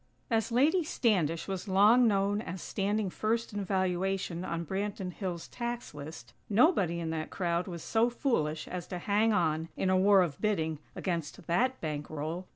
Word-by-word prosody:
As 225 0 +1
Lady 300 +9 +3
Standish 180 - +1
was 190 0 -4
long 210 +6 +6
known 200 0 +1
as 185 -3 -6
standing 205 +1 -1
first 225 +3 -1
in 205 -1 -2
valuation 185 -1 -1
on 170 -2 -3
Branton 190 0 -3
Hills' 175 -3 -4
tax 240 -4 -5
list, 150 +2 -9 0.2
nobody 200 - +3
in 165 -1 -3
that 155 -1 -3
crowd 175 -1 -1
was 170 -3 -6
so 230 +1 +2
foolish 160 - -1
as 180 -2 -5
to 180 - -4
hang 210 +5 +2
on, 160 -5 +1
in 185 - +1
a 185 - +4
war 195 0 +6
of 150 -5 -4
bidding, 160 -8 0 0.2
against 170 -3 -3
that 255 +10 +1
bankroll. 155 +3 -4
190 Hz, 165 wpm, -30 LUFS, 170-215 Hz, 0.2 s, long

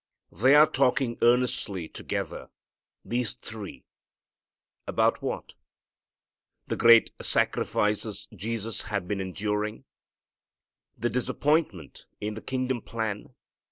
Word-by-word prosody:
They 130 +6 +5
are 150 +1 +9
talking 130 -4 +1
earnestly 120 -7 +2
together, - - -5 0.6
these 120 0 -1
three, 110 -4 -9 1.0
about - - +2
what? - - -4 1.1
The - - -2
great 115 0 +7
sacrifices 105 -1 0
Jesus 110 +2 -3
had 100 -5 -3
been 100 -1 -1
enduring? 105 +3 -2 1.1
The 120 - -1
disappointment 125 - 0
in 105 +1 -3
the 110 - -7
kingdom 130 -2 -2
plan? 110 -3 -4
115 Hz, 95 wpm, -27 LUFS, 105-125 Hz, 1.1 s, are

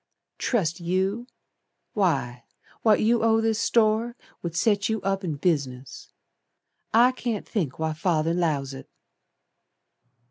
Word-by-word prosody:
"Trust 175 -9 0
you! 190 +7 -1 0.7
Why 135 - 0 0.4
What 220 -2 +4
you 230 +1 +3
owe 225 0 +3
this 225 -1 0
store 230 +1 +2 0.3
Would 170 -1 -5
set 205 +1 +2
you 220 0 0
up 195 0 -1
in 165 -5 -2
business. 140 -5 -2 0.8
I 240 +3 +5
can't 240 -4 -4
think 160 - -2
why 160 0 -1
Father 165 -1 0
'lows 150 -6 -1
it." 135 - -10
190 Hz, 120 wpm, -25 LUFS, 155-220 Hz, 0.8 s, I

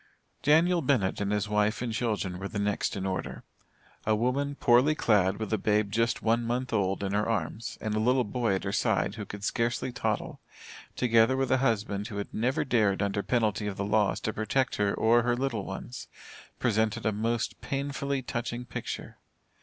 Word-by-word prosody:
Daniel 165 +4 +4
Bennett 125 -10 +1
and 100 0 -1
his 105 0 0
wife 105 +1 +1
and 120 -2 -3
children 105 -6 -2
were 100 - -4
the 105 - -6
next 100 0 0
in 95 - -3
order. 95 -1 -4 0.6
A 110 - +2
woman 135 +5 0
poorly 130 +4 +4
clad 100 -7 +2
with 110 -1 -3
a 110 - +1
babe 105 -1 +1
just 115 +2 0
one 115 +1 +3
month 120 +1 -2
old 95 -2 0
in 100 0 -2
her 105 +2 +1
arms, 115 0 -3
and 110 -1 -3
a 105 - +1
little 125 +3 +3
boy 115 -2 0
at 95 - -3
her 95 - -2
side, 100 - +1
who 110 -2 -6
could 100 0 -8
scarcely 120 +3 -1
toddle, 110 -4 -2 0.6
together 115 +1 +3
with 135 -1 0
a 130 - +4
husband 105 -5 0
who 105 -4 -6
had 100 - -5
never 125 +6 0
dared 105 -6 +2
under 100 0 0
penalty 110 -3 0
of 100 - -4
the 100 - -2
laws 105 0 +2
to 110 - -2
protect 110 +5 0
her 100 -1 +2
or 115 +3 +4
her 120 0 +1
little 120 -5 -2
ones, - - -7 0.5
presented 110 -2 0
a 110 - +3
most 115 +2 -2
painfully 140 -1 -2
touching 120 0 -4
picture. 120 - -6
110 Hz, 195 wpm, -28 LUFS, 105-125 Hz, 0.6 s, Daniel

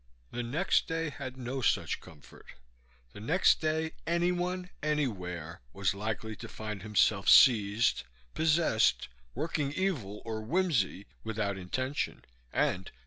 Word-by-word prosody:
The 120 - -3
next 140 +11 +1
day 165 -2 -2
had 130 -1 -7
no 130 +1 -4
such - - +1
comfort. 75 -3 -15 0.6
The - - -10
next 160 - +3
day 160 0 0 0.2
anyone, 180 +1 0
anywhere, 90 - -2
was 100 -1 0
likely 110 +2 -4
to - - -8
find 105 -3 -6
himself 105 -1 +2
seized, 110 -3 +6 0.3
possessed, 155 - +2 0.3
working 150 -3 -1
evil 145 - -2
or 110 -1 -3
whimsy 125 - 0 0.2
without 105 -3 -2
intention 130 +10 -3 0.3
and 95 +1 0
helplessly. - - -15
120 Hz, 125 wpm, -30 LUFS, 100-160 Hz, 0.6 s, seized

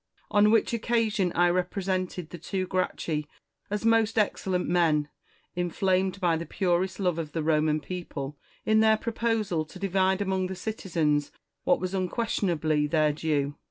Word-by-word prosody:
On 205 0 +5
which 225 +1 +3
occasion 225 -5 +1
I 175 0 +4
represented 185 -1 -2
the 175 - -8
two 185 +3 -2
Gracchi 170 -5 -2 0.4
as 210 +2 -2
most 225 -1 +3
excellent 190 -3 0
men, 160 -4 +2 0.5
in 175 0 -1
flamed 190 +2 +1
by 170 -4 +2
the 165 - -5
purest 185 0 0
love 180 -4 0
of 155 -3 -5
the 160 - -1
Roman 155 -1 +2
people, 150 -5 -6 0.3
in 220 0 +4
their 220 0 +5
proposal 220 -7 -1
to 160 - -12
divide 190 0 +1
among 190 -2 0
the 190 - -5
citizens 165 -8 -1 0.3
what - - +3
was 185 +1 -3
unquestion 195 +2 -1
ably 155 -3 +1
their 155 -1 +2
due. 145 -2 -1
185 Hz, 160 wpm, -27 LUFS, 160-200 Hz, 0.5 s, On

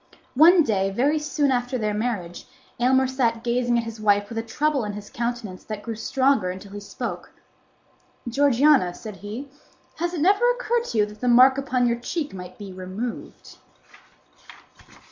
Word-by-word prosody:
One 330 +5 +7
day, 195 -6 0
very 275 +10 +1
soon 300 -2 0
after 250 0 -1
their 215 -2 -1
marriage, 210 -6 -4 0.3
Aylmer 260 +2 +3
sat 240 -3 -1
gazing 240 0 +1
at 235 - 0
his 225 -1 -8
wife 205 -1 +2
with 230 - -4
a - - 0
trouble 280 +4 -1
in 205 -1 -4
his 205 0 -9
countenance 235 -5 -4
that 215 -1 -6
grew 230 - -4
stronger 260 -2 +1
until 190 +2 -8
he 205 - -7
spoke. 205 - -6 1.0
"Georgiana," 275 -6 +3
said 215 -3 -9
he, 220 +9 -8 0.5
"has 345 +2 -2
it 315 - -3
never 405 +8 +4
occurred 480 -1 0
to 230 - -4
you 210 - +4
that 210 0 -13
the 250 - -1
mark 255 +3 +6
upon 255 -2 0
your 235 0 0
cheek 295 - -4
might 180 -1 -9
be 200 -3 -9
removed?" 190 +6 -7
240 Hz, 170 wpm, -24 LUFS, 210-275 Hz, 1.0 s, One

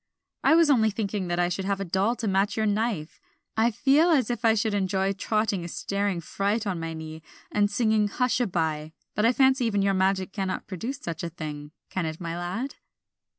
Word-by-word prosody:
"I 315 - +6
was 330 -3 +5
only 220 -5 +4
thinking 205 -2 -2
that 175 0 -1
I 175 0 +3
should 185 +2 -3
have 200 0 0
a 195 - -2
doll 190 +7 +1
to 230 - -3
match 195 +2 +1
your 220 - +1
knife. 205 -6 -1 0.3
I 225 +2 +3
feel 275 +8 +3
as 275 -7 +3
if 240 -1 -4
I 225 -1 +5
should 220 0 0
enjoy 195 0 +1
trotting 210 -1 0
a - - -5
staring 200 0 -2
fright 205 +6 -1
on 185 -4 -2
my 165 0 -4
knee, 160 0 -8 0.3
and 205 -1 +2
singing 215 0 +2
Hush 250 +5 0
a 245 - +1
by. 160 -3 -2 0.2
But 210 +2 +2
I - - +5
fancy 265 -1 +3
even 205 -3 +1
your 195 0 +2
magic 190 0 +1
cannot 190 -2 -3
produce 225 +9 -5
such 170 -8 -5
a 170 - -3
thing, 150 -3 -7 0.2
can 180 -3 -1
it, 160 0 -5
my 170 -2 -4
lad?" 185 +10 -4
200 Hz, 215 wpm, -26 LUFS, 175-225 Hz, 0.3 s, I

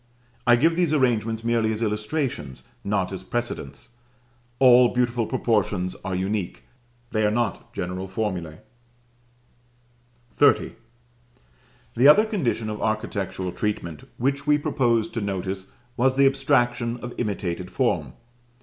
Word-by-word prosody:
I 120 - +7
give 165 +7 +3
these 170 -3 +1
arrangements 115 -4 +1
merely 115 -1 +1
as 110 +1 -2
illustrations, 105 - -3 0.2
not 100 -2 -1
as 95 - -5
precedents: 115 - -5 0.6
all 125 -1 +7
beautiful 120 -2 +1
proportions 105 -7 0
are 95 - -3
unique, 95 0 -3 0.5
they 110 -1 +1
are 105 - +4
not 110 -2 -2
general 90 +2 -4
formulæ. 95 -6 -4 1.7
XXX. 145 - +3 1.2
The 125 +4 +5
other 205 +9 +7
condition 155 - -1
of 105 0 -5
architectural 100 -4 -2
treatment 85 -7 -4
which 135 +2 -1
we 150 0 +5
proposed 120 -6 0
to 115 - -2
notice 95 -1 -4 0.2
was 130 +2 +2
the 140 +1 +5
abstraction 125 -3 +1
of 120 0 -7
imitated 90 -5 -3
form. 90 - 0
115 Hz, 120 wpm, -24 LUFS, 95-125 Hz, 1.7 s, I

